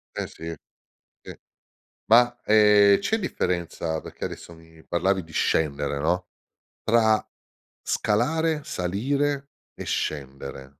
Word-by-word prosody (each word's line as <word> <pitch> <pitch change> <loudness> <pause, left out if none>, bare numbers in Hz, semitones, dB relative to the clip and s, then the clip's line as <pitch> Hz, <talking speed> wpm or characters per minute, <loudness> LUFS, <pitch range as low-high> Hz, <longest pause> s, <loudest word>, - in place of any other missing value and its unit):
Eh, - - -3
sì, 80 0 -7 0.7
sì. - - -10 0.7
Ma, 120 +2 +5
ehm, 105 -2 +6
c'è 220 - 0
differenza 85 - -2
perché - - -7
adesso 85 - -8
mi 80 -1 -18
parlavi 95 +2 0
di 80 - -16
scendere, 70 -2 0
no, 90 +5 0 0.6
tra 110 -1 +3 0.6
scalare, 155 +9 0
salire 140 +10 -1 0.2
e - - -8
scendere? 70 -2 -4
95 Hz, 105 wpm, -25 LUFS, 80-120 Hz, 0.7 s, ehm